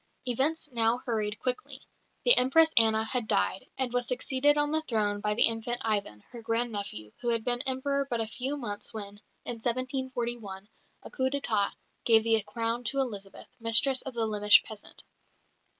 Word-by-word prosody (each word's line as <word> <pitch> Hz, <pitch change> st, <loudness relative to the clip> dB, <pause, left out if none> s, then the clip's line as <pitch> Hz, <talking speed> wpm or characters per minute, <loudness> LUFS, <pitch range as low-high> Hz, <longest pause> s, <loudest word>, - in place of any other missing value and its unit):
Events 280 Hz, +7 st, 0 dB
now 230 Hz, 0 st, +2 dB
hurried 215 Hz, -4 st, -2 dB
quickly. 255 Hz, +9 st, -4 dB, 0.5 s
The -, -, +8 dB
Empress 315 Hz, +6 st, +4 dB
Anna 220 Hz, -1 st, +4 dB, 0.2 s
died, 140 Hz, -, 0 dB
and 260 Hz, -2 st, -2 dB
was 245 Hz, -1 st, 0 dB
succeeded 265 Hz, +3 st, +1 dB
on 295 Hz, 0 st, +1 dB
the 315 Hz, 0 st, +1 dB
throne 210 Hz, -7 st, -1 dB
by 210 Hz, 0 st, 0 dB
the -, -, +4 dB
infant 230 Hz, +1 st, -2 dB
Ivan, 200 Hz, -, -2 dB
her 235 Hz, -, -9 dB
grand 230 Hz, +1 st, -1 dB
nephew, 155 Hz, -, -6 dB
who 240 Hz, -, -1 dB
had 230 Hz, -1 st, 0 dB
been 245 Hz, +1 st, 0 dB
Emperor 275 Hz, +1 st, -1 dB
but 235 Hz, -, -1 dB
a 225 Hz, -, 0 dB
few 260 Hz, +6 st, -4 dB
months 210 Hz, -6 st, -6 dB
when, 205 Hz, -1 st, -8 dB, 0.2 s
in 240 Hz, -, -3 dB
1741, 240 Hz, -5 st, -3 dB, 0.4 s
a -, -, -11 dB
coup 260 Hz, -1 st, 0 dB
d'état 225 Hz, -7 st, 0 dB, 0.3 s
gave 225 Hz, -2 st, +5 dB
the 225 Hz, -1 st, +2 dB
crown 230 Hz, +3 st, -3 dB
to 235 Hz, +6 st, -1 dB
Elizabeth, 205 Hz, -7 st, -5 dB
mistress 230 Hz, +4 st, +5 dB
of 265 Hz, -2 st, -8 dB
the 230 Hz, -1 st, 0 dB
Lemesh 210 Hz, -1 st, +5 dB
peasant. 215 Hz, -2 st, -11 dB
235 Hz, 170 wpm, -29 LUFS, 215-260 Hz, 0.5 s, The